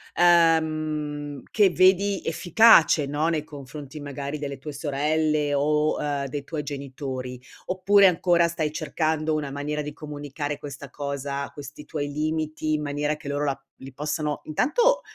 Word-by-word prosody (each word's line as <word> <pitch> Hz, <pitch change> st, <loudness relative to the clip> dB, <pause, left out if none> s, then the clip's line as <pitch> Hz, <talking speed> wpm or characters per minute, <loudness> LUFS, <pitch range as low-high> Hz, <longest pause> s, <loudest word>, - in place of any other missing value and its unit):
uhm, 155 Hz, -4 st, +2 dB
che 205 Hz, -3 st, +4 dB
vedi 190 Hz, +2 st, +3 dB
efficace, 170 Hz, -3 st, +5 dB
no, 150 Hz, +3 st, 0 dB
nei 155 Hz, -3 st, -1 dB
confronti 145 Hz, 0 st, -9 dB
magari 145 Hz, +1 st, -5 dB
delle 140 Hz, -2 st, -5 dB
tue 150 Hz, +2 st, -7 dB
sorelle 150 Hz, +1 st, 0 dB
o, 150 Hz, +2 st, +2 dB
uhm, 145 Hz, -1 st, -1 dB
dei 140 Hz, +1 st, -5 dB
tuoi 155 Hz, +1 st, -4 dB
genitori, 135 Hz, -3 st, -6 dB, 0.3 s
oppure 195 Hz, +2 st, +4 dB
ancora 175 Hz, -1 st, +4 dB
stai 160 Hz, -3 st, -2 dB
cercando 155 Hz, 0 st, -1 dB
una 150 Hz, -2 st, -2 dB
maniera 145 Hz, +2 st, -3 dB
di 150 Hz, -, -5 dB
comunicare 145 Hz, -1 st, -5 dB
questa 140 Hz, -2 st, -9 dB
cosa, 140 Hz, -1 st, -4 dB
questi 145 Hz, +1 st, -10 dB
tuoi 145 Hz, -3 st, -4 dB
limiti 155 Hz, +1 st, -2 dB
in 150 Hz, 0 st, 0 dB
maniera 145 Hz, +1 st, -1 dB
che 150 Hz, -1 st, -11 dB
loro 145 Hz, +1 st, -1 dB
la 135 Hz, -1 st, -2 dB
li 135 Hz, -, -10 dB
possano 150 Hz, +1 st, -2 dB
intanto 485 Hz, -, +2 dB
150 Hz, 145 wpm, -25 LUFS, 145-160 Hz, 0.3 s, efficace